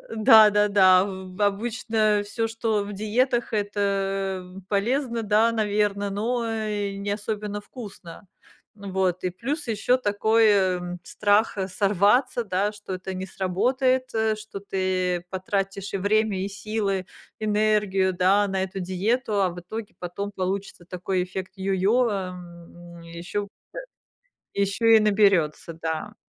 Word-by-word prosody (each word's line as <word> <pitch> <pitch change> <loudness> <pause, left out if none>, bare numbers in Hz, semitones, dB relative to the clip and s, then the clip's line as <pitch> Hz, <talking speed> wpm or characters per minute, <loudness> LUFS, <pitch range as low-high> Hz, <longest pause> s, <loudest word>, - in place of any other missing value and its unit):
да-да-да, 205 -4 +6
ав 200 - -1 0.3
обычно 215 0 +1
всё, 225 +2 -2
что 225 -2 -1
в 205 +1 -7
диетах- 235 +4 0
это 195 -2 -1 0.2
полезно, 235 +3 0
да, 215 +2 +3
наверно, 210 -2 0
э, - - -2
но 230 +4 -1 0.6
не 205 - -2
особенно 210 0 -4
вкусно. 205 -5 -11 0.5
Вот. 190 -3 -2
И - - +1
плюс 275 - -4
ещё 230 +3 +2
такой, 220 0 +2
эм, 180 -3 +1
страх, 210 +3 +1
э, 190 -1 -1
сорваться, 205 +6 +2
да, 200 +1 0
что 205 -2 -8
это 185 +1 -5
не 185 0 -4
сработает, 255 +8 0
э, 220 -1 +1
что 215 -2 -8
ты 185 -2 -1
потратишь 195 +1 -3
и - - 0
время, 205 0 +1
и 195 - -2
силы, 200 -1 -2 0.4
энергию, 210 -3 +2
да, 190 +3 +3
на 190 -1 -1
эту 190 +1 -5
диету. 205 +4 0
А 190 - +2
в 175 0 -8
итоге 215 +4 -7
потом 200 +3 -5
получится 190 -1 -4
такой 180 +1 -2
эффект 185 +1 -7
йо-йо, 195 +6 +2
эм, 175 -2 -8
ещё 170 +4 -5
э - - -9 1.2
ещё 200 +4 0
и 225 -1 +7
наберётся, 195 -7 +2
да. 160 -1 -3
200 Hz, 130 wpm, -25 LUFS, 185-215 Hz, 1.2 s, и